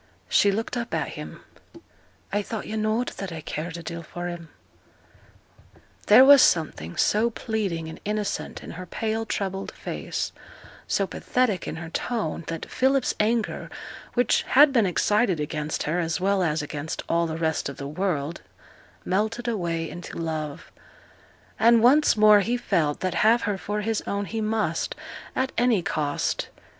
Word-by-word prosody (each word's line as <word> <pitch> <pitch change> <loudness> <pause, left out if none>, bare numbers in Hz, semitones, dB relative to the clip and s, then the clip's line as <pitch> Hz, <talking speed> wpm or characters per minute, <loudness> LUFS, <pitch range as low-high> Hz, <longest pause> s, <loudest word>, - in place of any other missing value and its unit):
She 200 - +4
looked 225 +5 -2
up 235 0 -3
at - - -1
him. - - -8 0.9
'I 205 - +2
thought 215 +1 -5
yo' 220 - -5
knowed 220 +3 0
that 195 -2 -5
I 165 - -5
cared 160 +3 -5
a 170 - -8
deal 170 +1 -5
for 175 +2 -6
him.' 170 -2 -8 1.6
There 260 - +9
was 280 -1 +9
something 115 - +1
so 220 +3 +3
pleading 205 -8 -3
and 160 - -8
innocent 210 0 -3
in - - -8
her 180 +2 -8
pale, 225 +3 -2
troubled 195 -1 -3
face, - - -4 0.6
so 195 - +1
pathetic 225 0 -1
in - - -4
her 165 0 -7
tone, 205 -9 -2
that 165 -1 -4
Philip's 265 0 +1
anger, 225 +1 0 0.5
which 245 0 +3
had 280 +1 +6
been 230 -6 +4
excited 200 0 +2
against 150 0 -2
her, 165 +4 0
as 165 -1 -1
well 195 +1 +2
as 160 -3 0
against 150 +1 -5
all 170 0 +1
the 160 0 -4
rest 160 -3 -1
of 140 - -8
the 140 - -5
world, 160 -1 -2 0.6
melted 220 +6 -1
away 170 -7 -1
into 175 +1 -8
love; 155 -2 -4 0.9
and 230 0 +5
once 275 +1 +5
more 210 -1 +7
he 235 +5 0
felt 155 -10 0
that 185 -2 -1
have 230 +3 +4
her 210 - 0
for 210 +2 -3
his 220 0 -1
own 200 0 -1
he 225 +2 -3
must, 215 -6 -1 0.4
at 260 0 0
any 235 -7 +3
cost. 145 -3 -1
195 Hz, 160 wpm, -25 LUFS, 165-225 Hz, 1.6 s, There